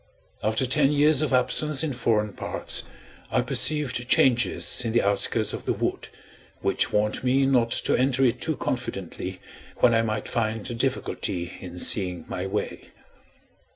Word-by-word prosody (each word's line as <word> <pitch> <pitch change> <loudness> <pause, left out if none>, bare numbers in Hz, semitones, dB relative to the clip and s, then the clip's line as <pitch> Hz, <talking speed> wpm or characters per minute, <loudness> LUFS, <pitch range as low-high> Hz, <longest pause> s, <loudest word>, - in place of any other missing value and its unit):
After 110 +4 +1
ten 135 +2 +3
years 150 0 +4
of 155 - 0
absence 135 +3 +2
in 150 -4 -1
foreign 110 -4 0
parts, - - -2 0.5
I - - +1
perceived 145 -5 0
changes 125 -1 +3
in 115 -1 -2
the 120 - +3
outskirts 100 0 +1
of - - -6
the - - +1
wood, - - -3 0.5
which - - 0
warned 105 +2 0
me 135 +2 +3
not 125 -4 +2
to - - +1
enter 130 +1 +2
it 120 - 0
too 160 -3 -1
confidently 95 -7 -4 0.4
when 120 - +4
I 115 - +3
might 110 -1 -3
find 110 -2 -2
a - - -4
difficulty 105 -7 -2
in 90 -1 -9
seeing 90 -4 +1
my 90 +1 -4
way. 105 +2 -4
120 Hz, 155 wpm, -25 LUFS, 105-135 Hz, 0.5 s, years